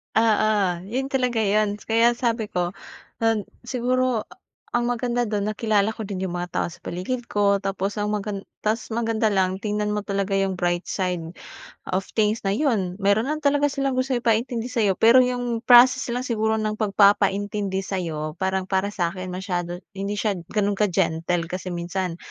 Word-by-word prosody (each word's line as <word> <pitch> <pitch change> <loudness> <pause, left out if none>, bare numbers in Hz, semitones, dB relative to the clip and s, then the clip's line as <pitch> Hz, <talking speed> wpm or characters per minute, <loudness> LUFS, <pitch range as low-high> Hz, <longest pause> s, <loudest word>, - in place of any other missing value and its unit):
Oo, 220 -1 +4 0.5
yun 265 +3 -1
talaga 250 -4 0
yun 210 0 +1
kaya 230 +1 +4
sabi 230 -3 -1
ko 175 +1 -1 0.5
nan 225 -3 +1 0.2
siguro, 250 -1 0
ah, - - -18 0.4
ang 240 0 +1
maganda 245 0 0
do'n 210 -2 -1
nakilala 215 -1 +1
ko 220 - -5
din 195 -2 -5
yung 175 - -5
mga 175 0 -4
tao - - 0
sa 170 - -11
paligid 235 +8 -4
ko, 200 -1 +3
tapos 195 +1 -2
ang 210 0 -1
magan 205 -1 -3 0.2
tas 220 +1 -1
maganda 225 -1 +1
lang, 190 -1 +1
tingnan 210 -1 -1
mo 210 0 -2
talaga 200 -1 -1
yung 195 -1 +1
bright 175 0 0
side 180 -4 -2 0.6
of 190 +1 0
things 215 0 +2
na 195 - +1
yun. 210 -11 0
Mayro'n 200 +5 +2
lang 305 +1 -2
talaga 290 0 +3
silang 275 -1 -1
gustong 255 -1 0
ipaintindi 230 +1 +1
sayo 220 -7 +1
pero 230 +6 +7
yung 245 -2 0
process 255 +2 +7
lang 245 +1 -2
siguro 220 -2 0
ng 215 -1 -1
pagpapaintindi 200 -1 +2
sa'yo 160 -6 -3
parang 190 0 0
para 190 +1 +1
sa'kin 185 0 -2
masyado 175 -2 -3 0.2
hindi 200 +2 -3
siya 210 -3 0
gano'n 205 +4 -1
ka-gentle 175 -3 +1
kasi 185 +1 -5
minsan. 175 0 -3
210 Hz, 170 wpm, -24 LUFS, 190-235 Hz, 0.6 s, pero